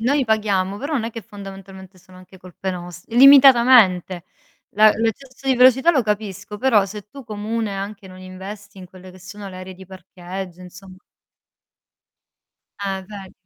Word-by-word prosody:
noi 270 +4 +1
paghiamo, 200 -3 -1
però 285 +6 -5
non 235 -5 -1
è 230 - -4
che 230 - -8
fondamentalmente 195 -2 -12
sono 185 +1 -19
anche 185 +1 -17
colpe 185 +1 -7
nost 175 0 -9
limitatamente. 240 -9 +6 0.5
La 215 +1 +5
l'eccesso 255 +5 -4
di 265 - +3
velocità 260 +6 +5
lo 265 -5 +1
capisco, 210 -1 -5
però 220 -5 +3
se 205 +1 -9
tu 275 +5 -12
comune 215 -1 -4
anche 195 0 -7
non 185 0 -13
investi 195 +2 -11
in 185 - -11
quelle 185 0 -15
che 185 - -17
sono 200 +2 -10
le 185 - -10
aree 185 0 -9
di 190 +1 -14
parcheggio 185 0 -10
insom 185 +1 -14 1.8
Eh 195 -1 -4
ve 200 -3 -11
200 Hz, 160 wpm, -20 LUFS, 185-225 Hz, 1.8 s, limitatamente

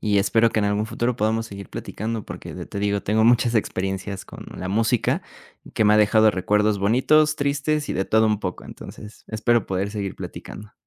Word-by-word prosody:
y 105 -2 +2
espero 115 +3 +3
que 110 - -1
en 105 - +1
algún 105 +1 0
futuro 120 +3 -1
podamos 110 +1 0
seguir 100 -2 -9
platicando 110 +1 -5
porque - - -8
ya - - -6
te 100 - -6
digo, 100 0 0
tengo 110 +2 +2
muchas 120 0 +3
experiencias 95 -1 -3
con - - -11
la 90 - -5
música, 110 +3 +1 0.5
que 110 - +2
me 105 +1 +5
ha - - +5
dejado 110 +1 +5
recuerdos 105 +2 +1
bonitos, 150 +9 +3
tristes 145 +1 -1
y - - -1
de 95 - -1
todo 110 0 +3
un 105 -1 +1
poco. - - -5
Entonces, 105 0 -11
espero 110 0 +1
poder 95 +2 -2
seguir 100 -2 -4
platicando. 105 +1 -9
110 Hz, 200 wpm, -23 LUFS, 100-115 Hz, 0.5 s, me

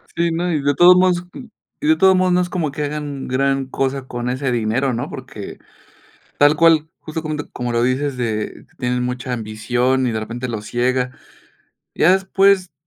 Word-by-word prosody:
Sí, 170 0 +1
no, 175 +2 -1
y 155 - 0
de 145 0 +2
todos 180 +3 +7
modos 180 -1 +3 0.6
y 300 - -1
de 315 - +5
todos 190 -5 +5
modos 185 -1 +2
no 180 - +3
es 180 - -2
como 160 -6 -2
que 150 +1 -4
hagan 145 -2 -4
gran 135 +1 0
cosa 135 0 -2
con 120 0 -4
ese 130 +1 -1
dinero, 120 +3 0
¿no? 120 - -3
Porque, 130 -7 -9 0.8
tal 145 +1 +6
cual, 160 -1 +4
justo 155 0 -5
como 155 -1 -3 0.2
como 120 -1 -4
lo 120 0 +2
dices, 130 +2 0
de 110 -3 -3
tienen 125 -1 -1
mucha 125 0 -3
ambición 120 +4 0
y - - 0
de 110 - -2
repente 120 +3 -5
los 110 -3 -5
ciega. 125 +1 0 0.8
Ya 180 - +4
después 190 -1 +2
135 Hz, 185 wpm, -19 LUFS, 125-165 Hz, 0.8 s, todos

